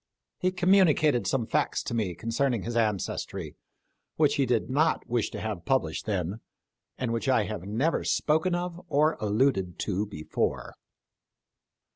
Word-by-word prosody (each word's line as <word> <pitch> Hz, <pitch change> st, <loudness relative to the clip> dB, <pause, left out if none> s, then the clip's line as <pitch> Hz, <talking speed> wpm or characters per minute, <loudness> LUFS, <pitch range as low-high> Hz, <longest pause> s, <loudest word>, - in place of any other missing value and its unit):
He 185 Hz, -, +1 dB
communicated 175 Hz, -7 st, +3 dB
some 130 Hz, -4 st, 0 dB
facts -, -, 0 dB
to -, -, -4 dB
me 105 Hz, -7 st, -1 dB
concerning 115 Hz, +1 st, -1 dB
his 120 Hz, 0 st, -4 dB
ancestry, 105 Hz, -5 st, -2 dB, 0.6 s
which 150 Hz, -2 st, +3 dB
he 135 Hz, -2 st, +2 dB
did 120 Hz, -2 st, +1 dB
not 155 Hz, +5 st, +1 dB
wish 120 Hz, -3 st, 0 dB
to -, -, -6 dB
have 105 Hz, -6 st, -4 dB
published 130 Hz, -3 st, 0 dB
then, 95 Hz, 0 st, -2 dB, 0.6 s
and 120 Hz, -2 st, -2 dB
which 115 Hz, +3 st, -1 dB
I 125 Hz, -4 st, +4 dB
have 100 Hz, -2 st, -5 dB
never 130 Hz, +11 st, 0 dB
spoken 160 Hz, +4 st, +1 dB
of 175 Hz, 0 st, -4 dB
or 155 Hz, 0 st, +3 dB
alluded 105 Hz, -4 st, +1 dB
to 100 Hz, +1 st, -1 dB
before." 80 Hz, -6 st, -3 dB
120 Hz, 145 wpm, -28 LUFS, 105-150 Hz, 0.6 s, I